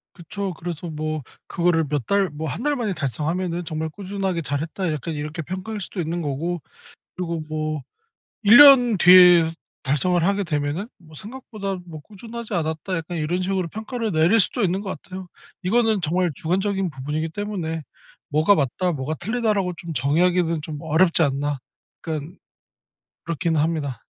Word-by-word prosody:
그쵸. 195 +2 -5
그래서 170 +1 -6
뭐 155 0 -3 0.3
그거를 170 -2 +1
몇 145 -4 -1
달 200 -2 +2
뭐 155 +2 -5
1 175 - -5
달 295 0 +2
만에 220 -5 -1
달성하면은 165 +4 -2
'정말 160 0 -3
꾸준하게 190 0 -3
잘했다.' 160 +5 -2
약간 155 +2 -4
이렇게 150 +2 -4
평가할 190 +6 -5
수도 185 - -6
있는 170 +2 -2
거고. 160 +4 -2 0.5
그리고 170 -3 -3
뭐 155 -1 -2 0.6
1 215 +3 +8
년 260 -6 +8
뒤에 180 -1 +8 0.4
달성을 160 +6 +1
하게 200 +2 +1
되면은 150 +3 -2
뭐 155 -3 -17
'생각보다 210 - -6
뭐 160 -3 -9
꾸준하지 225 +5 -9
않았다.' 160 +2 -2
약간 165 +2 -5
이런 165 +4 -1
식으로 185 -1 -1
평가를 220 +3 -4
내릴 170 +7 +4
수도 240 - -1
있는 190 +1 +1
것 195 -2 -5
같아요. 185 0 -9 0.4
이거는 220 +1 +2
정말 175 +2 +1
주관적인 190 +4 0
부분이기 150 +4 -3
때문에 170 -4 -4 0.5
''뭐가 155 +7 +5
맞다. 165 +5 0
뭐가 145 +1 -3
틀리다.'라고 210 -2 0
좀 170 0 -6
정의하기는 165 +4 +2
좀 150 -1 -6
어렵지 165 +2 +3
않나.' 145 0 -1 0.5
약간 160 +2 -5 0.9
그렇긴 165 0 -1
합니다. 150 -6 -1
175 Hz, 345 characters per minute, -23 LUFS, 155-195 Hz, 0.9 s, 1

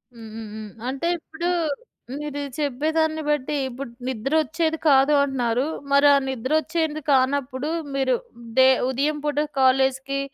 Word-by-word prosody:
హ్మ్. 225 -1 -10
హ్మ్. 225 -2 -7
హ్మ్. 215 -2 -8 0.2
అంటే 275 +5 -2
ఇప్పుడు 320 +3 -4 0.7
మీరు 295 -1 -5 0.2
చెప్పేదాన్ని 315 +3 0
బట్టి 295 0 0
ఇప్పుడు 260 0 -7 0.2
నిద్ర 260 +1 -3
వచ్చేది 320 +2 -1
కాదు 275 +1 +5
అంటున్నారు. 255 -2 0 0.3
మరి 280 +1 +6
ఆ - - +6
నిద్రొచ్చేది 310 +5 -1
కానప్పుడు 270 +1 +1 0.2
మీరు 265 -2 +2 0.4
డే 260 0 +7 0.2
ఉదయం 285 +4 0
పూట 295 -1 -2 0.2
కాలేజికి 265 +1 +2
275 Hz, 130 wpm, -23 LUFS, 260-300 Hz, 0.7 s, డే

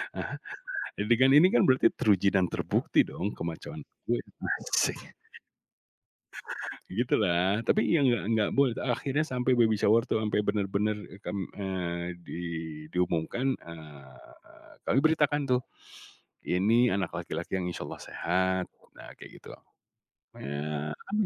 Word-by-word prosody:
heeh, - - -4 0.7
jadi 105 +3 +2
kan 130 +1 +6
ini 155 +5 +8
kan 120 - +5
berarti 130 0 +5
teruji 100 -5 +3
dan 95 -2 +4
terbukti - - +1
dong 100 +4 -4
ke-macho-an 85 -1 -6 0.3
gue, - - +1 0.5
asik. - - 0 1.8
Gitulah 95 -2 +1
tapi 210 - +2
ya 155 - +4
nggak 120 -5 +3
nggak 110 -2 +2
boleh 135 -4 +4
akhirnya 135 +4 0
sampai 130 -4 +1
baby 115 -3 +4
shower 110 +3 +4
itu 125 - -1
ampe 105 -1 0
benar 105 -1 0
benar 105 +2 0 0.3
kam 100 - -4 0.2
eee, 90 -3 -4
di 85 - -6 0.5
diumumkan, 90 +9 0
eee, 75 - -14
kami - - +1
beritakan 150 -2 +3
tuh, 125 -1 +2 0.9
ini 115 +7 +3
anak 95 -3 -1
laki-laki - - -5
yang 90 - -3
insyaallah - - -7
sehat 95 +1 0 0.3
nah - - -11
kayak - - -13
gitu, - - -14 0.9
makanya 75 +2 -4 0.2
mmm, 210 0 +2
105 Hz, 130 wpm, -29 LUFS, 90-125 Hz, 1.8 s, ini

